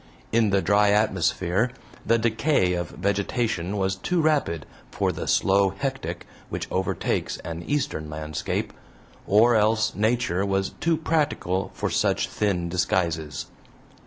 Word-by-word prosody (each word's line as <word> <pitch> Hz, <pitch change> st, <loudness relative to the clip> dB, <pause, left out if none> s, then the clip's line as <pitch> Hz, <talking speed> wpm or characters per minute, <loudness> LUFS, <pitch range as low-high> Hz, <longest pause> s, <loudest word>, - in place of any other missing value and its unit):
In 115 Hz, -1 st, +3 dB
the 100 Hz, -1 st, +2 dB
dry 105 Hz, 0 st, +4 dB
atmosphere 95 Hz, 0 st, +1 dB, 0.3 s
the 115 Hz, -, +3 dB
decay 115 Hz, -3 st, +2 dB
of 85 Hz, -1 st, -2 dB
vegetation 100 Hz, 0 st, -1 dB
was 95 Hz, 0 st, 0 dB
too 175 Hz, -, -1 dB
rapid 145 Hz, -, +1 dB, 0.2 s
for -, -, 0 dB
the -, -, -5 dB
slow 95 Hz, 0 st, +3 dB
hectic 135 Hz, +1 st, -4 dB, 0.2 s
which -, -, -4 dB
overtakes 95 Hz, 0 st, -1 dB
an 85 Hz, 0 st, -5 dB
Eastern 140 Hz, -, -2 dB
landscape, 75 Hz, 0 st, -3 dB, 0.5 s
or 115 Hz, +4 st, +5 dB
else 110 Hz, 0 st, +2 dB
Nature 110 Hz, -3 st, +1 dB
was 95 Hz, -1 st, 0 dB
too 165 Hz, -1 st, 0 dB
practical 145 Hz, -, 0 dB
for -, -, -2 dB
such -, -, +1 dB
thin 95 Hz, -5 st, 0 dB
disguises. 85 Hz, -4 st, -1 dB
100 Hz, 130 wpm, -25 LUFS, 90-115 Hz, 0.5 s, or